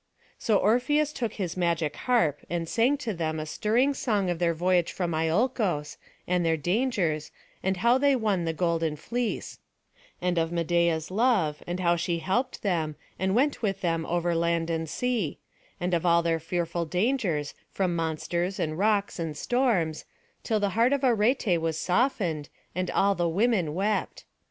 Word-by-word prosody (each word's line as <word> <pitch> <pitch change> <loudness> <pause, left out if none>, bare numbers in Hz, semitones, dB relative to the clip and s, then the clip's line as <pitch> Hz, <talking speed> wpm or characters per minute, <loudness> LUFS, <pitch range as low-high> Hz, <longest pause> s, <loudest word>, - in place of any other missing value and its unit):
So 215 -3 +2
Orpheus 275 +9 +2
took 235 -4 -3
his 185 -5 -3
magic 170 -4 0
harp, 170 - +1
and 170 -1 -2
sang 245 - +2
to 240 -6 -3
them 160 -2 -2
a 155 - -3
stirring 235 - +1
song 205 -8 0
of 170 - -3
their 170 -1 +1
voyage 180 0 +2
from 175 -3 -2
Iolcos, 165 - 0 0.3
and 180 0 +1
their 165 -1 +2
dangers, 175 - 0 0.3
and 190 0 0
how 235 +6 +3
they 280 0 +4
won 210 -7 0
the 165 - 0
golden 165 -2 0
fleece; 235 +9 -3 0.6
and 180 -1 0
of 165 0 0
Medeia's 170 -1 +1
love, 195 -9 +2
and 175 +1 -3
how 175 -1 +3
she 170 0 -1
helped 240 +10 -1
them, 165 -6 0 0.2
and 190 +2 +1
went 280 +3 +2
with 195 -4 -1
them 165 -2 -1
over 175 0 0
land 170 0 0
and 160 -1 -2
sea; 235 - -1 0.4
and 180 +1 -1
of 170 - +1
all 170 -1 +4
their 165 -1 +1
fearful 170 +1 -2
dangers, 180 - 0 0.2
from 185 -3 -1
monsters, 170 +3 -2
and 155 +1 -2
rocks, 205 -2 +1
and 160 -3 -3
storms, 215 - 0 0.4
till 220 -2 0
the 205 -1 +1
heart 230 +7 +3
of 280 -1 -1
Arete 225 -6 +2
was 160 -1 -1
softened, 180 - 0 0.2
and 185 +1 -2
all 200 0 +3
the 175 -3 0
women 185 -4 +1
wept. 205 +3 -1
180 Hz, 170 wpm, -27 LUFS, 165-220 Hz, 0.6 s, they